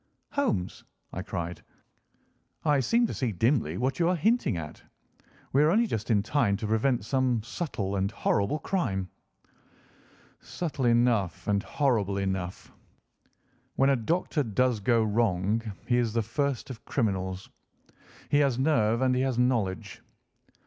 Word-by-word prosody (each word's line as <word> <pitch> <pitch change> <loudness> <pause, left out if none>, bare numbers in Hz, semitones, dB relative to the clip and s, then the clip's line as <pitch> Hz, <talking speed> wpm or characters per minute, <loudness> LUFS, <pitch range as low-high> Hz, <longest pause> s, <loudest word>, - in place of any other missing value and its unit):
"Holmes," 245 - -1 0.3
I 90 - -3
cried, 90 -3 -5 1.0
"I 145 -2 +4
seem 235 - +2
to - - -3
see 125 -4 -1
dimly 105 - +1
what 130 - -1
you 170 0 +3
are 180 - +2
hinting 200 - +1
at. 75 -2 -7 0.7
We 140 - +5
are 150 - +5
only 220 +7 +3
just 110 - -3
in 105 -3 +3
time 110 -5 +1
to 110 - -5
prevent 110 +1 +1
some 130 -3 +1
subtle 110 - -3
and 95 +1 0
horrible 100 +4 0
crime." 105 - -2 1.3
"Subtle 150 -7 -4
enough 115 -7 +2
and 100 -1 +2
horrible 115 - 0
enough. 95 -2 -3 1.0
When 135 +1 +4
a - - +4
doctor 155 +6 0
does 125 -1 +1
go 115 +2 +2
wrong 105 -1 +1 0.2
he 120 - +2
is 115 -3 0
the 115 -1 +1
first 140 +3 -2
of 115 - -10
criminals. 95 -6 -2 0.8
He 145 - +3
has 140 -4 +2
nerve 120 -4 +2
and 130 -1 +3
he 125 - +1
has 130 -2 0
knowledge. 115 -8 0
115 Hz, 145 wpm, -28 LUFS, 100-135 Hz, 1.3 s, We